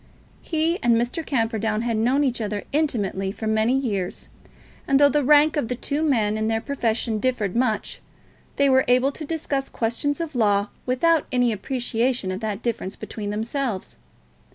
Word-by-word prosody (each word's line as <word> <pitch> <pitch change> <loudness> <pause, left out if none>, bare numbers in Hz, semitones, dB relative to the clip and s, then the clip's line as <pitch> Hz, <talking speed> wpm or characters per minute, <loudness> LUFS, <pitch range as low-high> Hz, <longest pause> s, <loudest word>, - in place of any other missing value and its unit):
He 325 +2 0
and 240 -2 +4
Mr. 240 +8 -1
Camperdown 225 -5 -1
had 235 -1 0
known 250 +6 +2
each 250 -4 0
other 210 -1 -3
intimately 205 -10 0
for 220 - -7
many 220 +4 +2
years, 200 -9 -3 0.6
and 275 -1 +4
though 285 0 +7
the 295 0 +1
rank 300 +3 +5
of 290 -6 0
the 250 - -2
two 285 +4 -2
men 220 -8 +1
in 220 - 0
their 225 0 +1
profession 225 -4 -1
differed 225 -6 -1
much, 225 -4 -1 0.5
they 280 - +3
were 260 -1 +4
able 250 +3 +3
to 310 - -8
discuss 290 -3 -2
questions 240 +6 -1
of 330 -2 -4
law 205 -4 +2 0.2
without 315 +6 +2
any 245 -2 +2
appreciation 240 -1 -1
of 185 - -4
that 215 0 -4
difference 220 -5 -3
among 210 -2 -6
themselves. 225 0 -3
240 Hz, 170 wpm, -23 LUFS, 220-280 Hz, 0.6 s, though